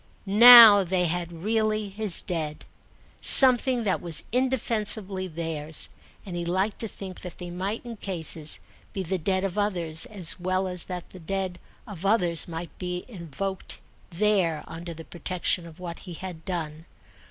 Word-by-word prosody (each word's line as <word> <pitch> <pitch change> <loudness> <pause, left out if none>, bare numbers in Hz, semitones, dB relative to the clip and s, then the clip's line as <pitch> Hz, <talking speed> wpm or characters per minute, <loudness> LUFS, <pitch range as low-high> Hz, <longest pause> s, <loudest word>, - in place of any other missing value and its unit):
Now 220 0 +9
they 180 0 -1
had 175 0 -3
really, 215 -1 -1
his 200 -2 0
Dead, 155 -5 -5 0.6
something 255 -2 +6
that 195 -3 -1
was 165 -3 -1
indefensibly 215 -6 -1
theirs; 160 -2 -4 0.4
and 185 -3 -7
he 175 - -3
liked 190 +4 -2
to 225 - -2
think 190 -2 -10
that 180 - -10
they 175 -1 -8
might 195 +7 -5
in 235 -2 -8
cases 165 -5 -2 0.3
be 190 - -4
the 185 +1 -2
Dead 190 +3 -1
of 195 +1 -3
others, 170 -6 0
as 185 -6 +4
well 185 +1 -1
as 180 -2 -5
that 180 -2 -8
the 185 - -12
Dead 185 +1 -4 0.3
of 195 -6 -10
others 180 -5 +3
might 170 0 -8
be 180 -1 -5
invoked 190 - -6 0.3
there 180 -4 0
under 170 0 -9
the 165 0 -11
protection 175 0 -2
of 165 0 -15
what 170 -2 -8
he 180 -3 -10
had 175 -2 -9
done. 160 -3 -5
185 Hz, 160 wpm, -25 LUFS, 170-205 Hz, 0.6 s, Now